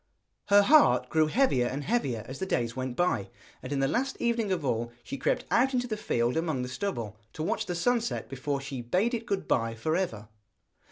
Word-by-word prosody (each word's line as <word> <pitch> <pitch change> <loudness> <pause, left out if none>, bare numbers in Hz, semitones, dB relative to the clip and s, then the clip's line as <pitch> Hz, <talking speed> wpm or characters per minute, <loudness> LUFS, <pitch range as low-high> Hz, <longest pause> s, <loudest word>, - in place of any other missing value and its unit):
Her 205 0 +6
heart 160 - +5
grew 155 -1 +3
heavier 155 - +2
and 140 +4 -3
heavier 135 - -1
as 130 +1 -7
the 190 - -2
days 115 -7 -1
went 130 -1 -3
by, 175 - 0 0.3
and 130 - -7
in 140 -1 0
the 135 - +3
last 260 - -1
evening 235 -4 0
of 170 -6 -1
all 120 -2 -1
she - - -5
crept - - 0
out 260 +2 +3
into 245 0 +1
the 225 -3 -3
field 120 - 0
among 160 -6 -1
the 125 - -5
stubble, 120 - -4
to 155 - -4
watch - - -1
the 175 - -2
sun 240 +7 +2
set 235 - -3
before 135 +1 -3
she 135 -2 -5
bade 185 - +1
it 230 -1 -3
good 200 -4 -2
bye 115 -1 +1
for 155 +8 -1
ever. 115 - -2
155 Hz, 220 wpm, -28 LUFS, 125-210 Hz, 0.3 s, Her